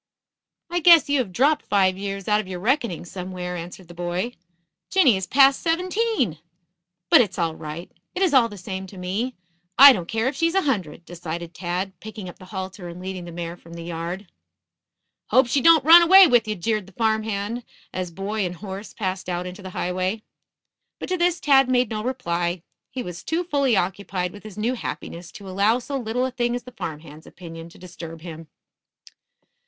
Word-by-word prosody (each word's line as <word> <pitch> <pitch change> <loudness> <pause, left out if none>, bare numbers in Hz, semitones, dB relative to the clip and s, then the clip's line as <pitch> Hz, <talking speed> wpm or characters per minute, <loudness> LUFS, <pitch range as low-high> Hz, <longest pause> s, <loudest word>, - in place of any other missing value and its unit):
"I 350 - +1
guess 335 -3 +7
you 285 -1 +3
have 225 -7 -2
dropped 280 - +2
five 190 -2 +3
years 195 0 -5
out 210 0 +3
of 205 - -12
your 185 -1 -5
reckoning 230 - 0
somewhere," 180 0 -6
answered 175 +1 -8
the 175 - -12
boy. 175 +7 -3 0.6
"Jinny 300 - +5
is 190 -1 -3
past 275 0 +5
seventeen. 360 - 0 0.7
But - - +9
it's 215 - -2
all 165 -3 0
right. 160 +3 -8 0.2
It 375 - +1
is 355 -6 +2
all 245 -4 +5
the 205 - -10
same 190 +1 -6
to 190 - -13
me. 200 +8 -3 0.4
I 275 +1 +11
don't 175 -7 -4
care 225 +4 -1
if 265 - -1
she's 330 +5 0
a 385 - +3
hundred," 180 - -2
decided 170 0 -6
Tad, 180 +2 -3
picking 215 -3 -8
up 175 - -11
the 185 - -12
halter 190 -1 -6
and 170 +1 -9
leading 185 -1 -6
the 170 - -8
mare 170 0 -5
from 170 -1 -15
the 170 - -7
yard. 170 +3 -5 1.0
"Hope 260 +1 +4
she 265 +3 +1
don't 325 -3 +6
run 335 +2 +10
away 380 +3 +9
with 240 -7 +3
ye," 215 - -1
jeered 210 +1 -2
the 195 - -16
farm 220 +1 +1
hand, 220 +2 -3 0.3
as 185 -1 -3
boy 195 +4 -3
and 180 -1 -3
horse 195 +2 -8
passed 190 -3 -3
out 175 0 -2
into 180 +3 -8
the 190 - -8
highway. 185 +4 -2 0.7
But - - -7
to 365 - 0
this 345 0 +1
Tad 270 -3 +4
made 250 -2 +2
no 215 -1 -3
reply. 175 -9 -2 0.3
He 255 - -5
was 175 -1 -7
too 330 +2 -1
fully 280 - +1
occupied 185 -1 -2
with 205 - -12
his 215 -2 -11
new 225 +4 0
happiness 175 -7 -6
to 205 -5 -10
allow 200 +5 +2
so 265 +3 -6
little 250 0 -1
a 260 - -3
thing 240 -1 -1
as 245 - -5
the 250 - -11
farm 160 -10 -6
hand's 155 0 -14
opinion 165 -2 -10
to - - -17
disturb 165 -2 -10
him. 165 -1 -9
195 Hz, 200 wpm, -23 LUFS, 180-250 Hz, 1.0 s, I